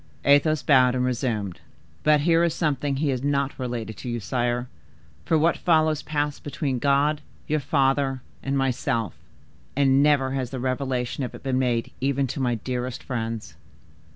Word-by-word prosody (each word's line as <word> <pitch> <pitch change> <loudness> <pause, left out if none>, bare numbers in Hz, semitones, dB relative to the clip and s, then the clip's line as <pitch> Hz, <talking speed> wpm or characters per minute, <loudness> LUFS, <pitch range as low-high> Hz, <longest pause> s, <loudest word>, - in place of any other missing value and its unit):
Athos 145 +2 +4
bowed 130 -3 +5
and 125 0 +1
resumed. 115 -7 -2 0.4
"But 150 -1 +4
here 165 +2 +3
is 170 -2 +1
something 145 -3 0
he 145 +2 0
had 130 -1 -1
not 140 -1 0
related 120 -3 -4
to 125 - -6
you, 120 0 -2
sire, 120 +2 -1 0.6
for 160 - +3
what 165 +2 +2
follows 155 -3 +2
passed 145 -1 -2
between 140 -3 -2
God, 145 +3 +2 0.2
your 155 0 0
father, 135 -1 +1 0.2
and 135 0 -1
myself; 130 -3 0 0.6
and 135 0 +4
never 140 -3 +3
has 130 -2 -2
the 130 - -5
revelation 130 0 -2
of 125 - -5
it - - -12
been 130 -1 0
made 120 -3 0
even 140 +1 +1
to - - -6
my 125 -2 +1
dearest 125 +2 -4
friends. 115 -3 -4
135 Hz, 165 wpm, -25 LUFS, 125-145 Hz, 0.6 s, bowed